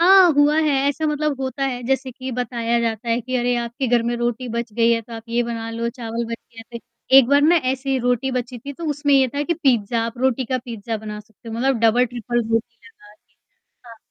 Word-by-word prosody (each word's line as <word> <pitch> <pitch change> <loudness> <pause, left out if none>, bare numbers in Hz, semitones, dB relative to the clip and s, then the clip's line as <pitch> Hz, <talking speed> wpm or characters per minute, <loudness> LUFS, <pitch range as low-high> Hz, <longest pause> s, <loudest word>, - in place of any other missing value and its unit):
हाँ, 370 0 +7
हुआ 290 +1 +4
है 310 -1 +2 0.2
ऐसा। 310 +2 -1
मतलब, 300 -2 -1
होता 265 +1 -2
है 250 -2 -3
जैसे 265 0 0
कि 260 +1 -7
बताया 235 -1 -1
जाता 230 0 -2
है 230 +1 +1
कि, 255 +2 -6
"अरे, 245 0 +1
आपके 240 +3 -3
घर 240 -1 +3
में 235 +1 -1
रोटी 240 +1 -2
बच 235 -1 -4
गई 230 +1 +3
है, 230 - +1
तो 230 - -14
आप 225 -1 -7
ये 235 +1 +1
बना 230 -1 -4
लो।" 230 +1 -2
चावल 235 -1 -4
बन 230 0 -4
गया 230 0 -12
त - - -23 0.3
एक 265 -2 +9
बार 285 +1 +5
ना, 330 +4 +5
ऐसी 265 -2 0
रोटी 245 +1 0
बची 250 0 -3
थी, 280 +5 -8
तो 335 +4 -8
उसमें 290 0 0
ये 265 -1 +5
था 285 +4 -3
कि 340 - 0
आप 335 - -7
पिज़्ज़ा 230 -3 +2
रोटी 260 +1 +1
का 255 +2 -1
पिज़्ज़ा 230 -2 -5
बना 210 0 -7
सकते 220 +2 -16
हो, 225 - -5
मतलब, 260 +2 +1
डबल-ट्रिपल 240 +1 +1
रोटी 230 +1 -1
लगाके। 210 -2 -20 0.5
हाँ, 230 - -12
240 Hz, 235 wpm, -21 LUFS, 230-270 Hz, 0.5 s, एक